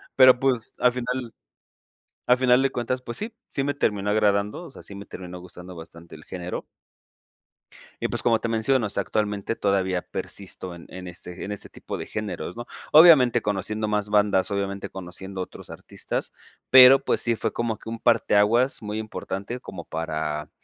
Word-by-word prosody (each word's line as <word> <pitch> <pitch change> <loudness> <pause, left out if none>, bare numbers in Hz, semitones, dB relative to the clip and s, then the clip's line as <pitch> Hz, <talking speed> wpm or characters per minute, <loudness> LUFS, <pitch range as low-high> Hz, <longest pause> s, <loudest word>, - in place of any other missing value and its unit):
Pero, 130 -1 +7
pues 125 -4 0
al 125 - +4
final 125 -1 -3 1.0
al 125 - +5
final 125 0 +4
de 135 - +2
cuentas, 125 +1 -2
pues 120 -2 -6
sí, 220 +2 -5
sí 135 - -1
me 145 +1 -1
terminó 105 -6 0
agradando, 105 +4 +1
o 170 - -11
sea, - - -13
sí 100 - -7
me 100 0 -8
terminó 90 -1 -9
gustando 90 0 -11
bastante 85 0 -12
el 75 - -13
género. 90 -1 -6 1.4
Y - - 0
pues - - -1
como 115 -2 +3
te 115 - -3
menciono, 115 +1 +1
o - - -8
sea, 100 - 0
actualmente 105 +1 -2
todavía 95 -3 0
persisto 95 -2 -6
en 85 - -12
en 90 0 -8
ese 90 0 -8
en 105 - -5
ese 100 - -7
tipo - - -7
de - - -6
géneros, 95 -6 -5
¿no? 120 - -5 0.3
Obviamente 145 -7 +7
conociendo 105 +1 -2
más 105 -1 0
bandas, 105 -1 +2
obviamente 100 0 -3
conociendo 95 +1 -7
otros 90 - -9
artistas, - - -5 0.4
pero, 130 +1 +9
pues, - - +1
sí 115 -1 +1
fue - - -2
como 115 -2 -2
que - - -10
un 115 0 -5
parteaguas 115 +3 +3
muy 105 0 -4
importante 110 +1 -5
como 95 -8 -9
para 75 -2 -3
105 Hz, 180 wpm, -25 LUFS, 95-120 Hz, 1.4 s, pero